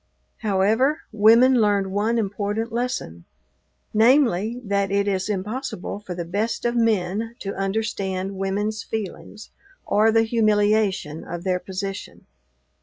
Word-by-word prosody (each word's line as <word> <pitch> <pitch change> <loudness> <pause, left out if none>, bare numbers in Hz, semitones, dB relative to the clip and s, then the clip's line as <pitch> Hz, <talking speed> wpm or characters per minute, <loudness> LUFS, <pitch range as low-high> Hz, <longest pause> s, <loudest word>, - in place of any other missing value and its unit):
However, 220 +8 +1
women 230 +4 +5
learned 200 -2 +1
one 215 +4 0
important 210 +1 -2
lesson 235 - -3 0.7
namely, 230 -2 +3
that 200 -2 0
it 200 +1 +1
is 190 0 -1
impossible 210 +1 -4
for 190 -4 -7
the 175 -1 -4
best 205 +9 -2
of 240 0 +1
men 225 0 0
to 195 - -4
understand 195 -1 -2
women's 205 +3 -2
feelings 215 0 -7 0.3
or 215 +2 +3
the 225 0 +4
humiliation 210 -7 +1
of 175 0 -6
their 185 -1 0
position. 190 +1 -6
205 Hz, 120 wpm, -23 LUFS, 195-225 Hz, 0.7 s, women